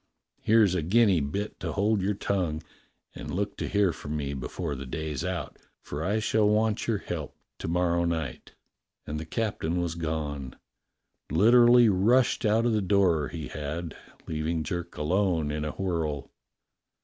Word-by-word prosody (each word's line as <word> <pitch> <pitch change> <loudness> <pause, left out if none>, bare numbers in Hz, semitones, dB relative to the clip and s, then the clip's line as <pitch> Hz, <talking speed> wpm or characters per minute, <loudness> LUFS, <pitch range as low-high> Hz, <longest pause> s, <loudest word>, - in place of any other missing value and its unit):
Here's 110 -4 +4
a 90 - 0
guinea 100 +2 +4
bit 95 +9 -3
to - - -3
hold 105 0 +1
your 100 +2 0
tongue; 85 -6 -1 0.5
and - - -8
look 100 +3 -2
to - - -3
hear 100 -4 +2
from 75 +1 -5
me 70 -1 -3
before 75 +4 -4
the 70 -1 -6
day's 75 +1 -4
out, - - -4 0.2
for 75 +2 -5
I 100 +4 +1
shall 110 -1 +2
want 105 0 +1
your 115 -3 +1
help 80 -6 -6 0.2
to - - -4
morrow 85 0 +1
night." 80 -2 -4 0.5
And 75 +1 -4
the 80 - -7
captain 90 -4 -1
was 85 -2 -1
gone. 75 -5 -4 0.8
Literally 120 +5 +6
rushed 110 +7 +3
out 110 +2 +3
of 120 - +2
the 105 - +2
door 95 -6 +2
he 80 -4 -6
had, 75 +3 -5 0.3
leaving 80 +1 -2
Jerk 85 +1 -5
alone 80 -1 +1
in 75 0 -2
a 75 - -2
whirl. 80 -7 -2
85 Hz, 160 wpm, -27 LUFS, 75-105 Hz, 0.8 s, Literally